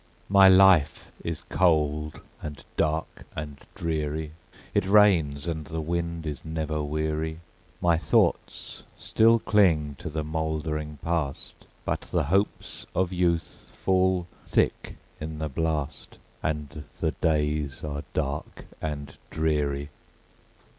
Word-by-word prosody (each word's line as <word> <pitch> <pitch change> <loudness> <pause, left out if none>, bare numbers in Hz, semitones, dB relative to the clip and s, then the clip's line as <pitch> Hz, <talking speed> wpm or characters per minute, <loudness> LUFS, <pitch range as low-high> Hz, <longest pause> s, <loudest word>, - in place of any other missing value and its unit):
My 100 -1 +8
life 95 -5 +5
is 85 -2 -4
cold, 75 -3 +1 0.2
and 75 -2 -7
dark, 80 0 -1
and 75 -2 -6
dreary; 80 -1 -2 0.4
It 95 - +1
rains, 90 -9 +4
and 80 -3 -3
the 80 +2 -4
wind 85 0 -2
is 75 -4 -5
never 80 -1 -2
weary; 80 +2 -2 0.4
My 85 -2 +3
thoughts 80 - 0 0.2
still 115 +1 +4
cling 85 -10 +3
to - - -5
the 80 0 -3
mouldering 75 -1 -3
Past, 80 -5 -3 0.2
But - - -1
the - - -1
hopes 95 +8 -1
of 95 0 +1
youth 85 -2 -1
fall 95 -1 +2 0.2
thick - - 0 0.2
in 80 0 -5
the 80 0 -3
blast, 75 0 -3 0.2
And 75 -1 -3
the 80 - +1
days 75 -1 0
are 70 -1 -3
dark 70 -1 -3 0.2
and 75 -2 -4
dreary. 75 -2 0
80 Hz, 120 wpm, -27 LUFS, 75-85 Hz, 0.4 s, My